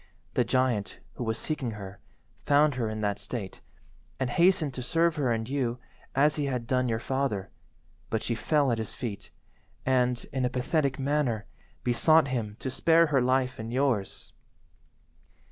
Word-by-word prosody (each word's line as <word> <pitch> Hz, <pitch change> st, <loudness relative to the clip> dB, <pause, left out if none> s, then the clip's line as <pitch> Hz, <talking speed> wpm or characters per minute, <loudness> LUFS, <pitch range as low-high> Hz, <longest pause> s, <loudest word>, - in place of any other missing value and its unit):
The 125 Hz, -, +3 dB
giant, 125 Hz, -4 st, 0 dB, 0.2 s
who -, -, -5 dB
was 110 Hz, -1 st, -1 dB
seeking 135 Hz, -7 st, -3 dB
her, 100 Hz, -1 st, -9 dB, 0.4 s
found 145 Hz, +1 st, +4 dB
her 120 Hz, -3 st, -1 dB
in 110 Hz, 0 st, -4 dB
that 105 Hz, -1 st, -1 dB
state, 105 Hz, -1 st, -6 dB, 0.6 s
and 130 Hz, -2 st, -1 dB
hastened 170 Hz, -3 st, +3 dB
to 125 Hz, -, -5 dB
serve 165 Hz, +5 st, +2 dB
her 135 Hz, -5 st, +1 dB
and 110 Hz, -1 st, -1 dB
you 130 Hz, -3 st, -1 dB, 0.4 s
as 150 Hz, +3 st, +3 dB
he 145 Hz, -, 0 dB
had 125 Hz, -4 st, -2 dB
done 125 Hz, 0 st, +1 dB
your 115 Hz, -, +1 dB
father, 120 Hz, -6 st, -2 dB, 0.6 s
but 110 Hz, -, -1 dB
she 120 Hz, -, -1 dB
fell 140 Hz, +3 st, +2 dB
at 115 Hz, -, 0 dB
his 110 Hz, -, -4 dB
feet, 110 Hz, -6 st, -5 dB, 0.6 s
and, 125 Hz, -2 st, +2 dB
in 130 Hz, -1 st, 0 dB
a 125 Hz, -, +2 dB
pathetic 130 Hz, +2 st, 0 dB
manner, 135 Hz, -6 st, 0 dB, 0.4 s
besought 140 Hz, +5 st, +4 dB
him 110 Hz, -5 st, -2 dB
to 130 Hz, -, -3 dB
spare 165 Hz, +5 st, +4 dB
her 135 Hz, -, +5 dB
life 130 Hz, 0 st, +1 dB
and 110 Hz, +1 st, -5 dB
yours. 125 Hz, -6 st, -1 dB
125 Hz, 165 wpm, -28 LUFS, 115-140 Hz, 0.6 s, her